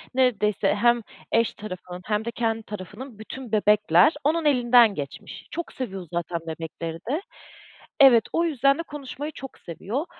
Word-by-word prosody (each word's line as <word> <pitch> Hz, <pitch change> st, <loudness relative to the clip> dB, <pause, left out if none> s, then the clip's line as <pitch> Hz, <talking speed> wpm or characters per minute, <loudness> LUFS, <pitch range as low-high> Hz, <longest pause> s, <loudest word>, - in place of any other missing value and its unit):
Neredeyse 210 Hz, -6 st, +2 dB
hem 235 Hz, +2 st, +3 dB, 0.3 s
eş 230 Hz, 0 st, +2 dB
tarafının 180 Hz, -3 st, -8 dB
hem 210 Hz, 0 st, -1 dB
de 235 Hz, -, -2 dB
kendi 225 Hz, -2 st, -1 dB
tarafının 215 Hz, +4 st, -9 dB
bütün 245 Hz, +1 st, -8 dB
bebekler 210 Hz, -, +4 dB
onun 315 Hz, +2 st, +1 dB
elinden 240 Hz, -5 st, +5 dB
geçmiş. 140 Hz, -2 st, -8 dB
Çok 340 Hz, -, -5 dB
seviyor 195 Hz, -9 st, -5 dB
zaten 170 Hz, 0 st, -2 dB
bebekleri 165 Hz, 0 st, -5 dB
de. 310 Hz, +7 st, 0 dB, 0.8 s
Evet, 245 Hz, -5 st, +8 dB
o 335 Hz, +1 st, +2 dB
yüzden 275 Hz, -2 st, +2 dB
de -, -, -2 dB
konuşmayı 295 Hz, 0 st, -7 dB
çok 270 Hz, -2 st, -10 dB
seviyor. 210 Hz, -, -4 dB
225 Hz, 145 wpm, -25 LUFS, 195-265 Hz, 0.8 s, Evet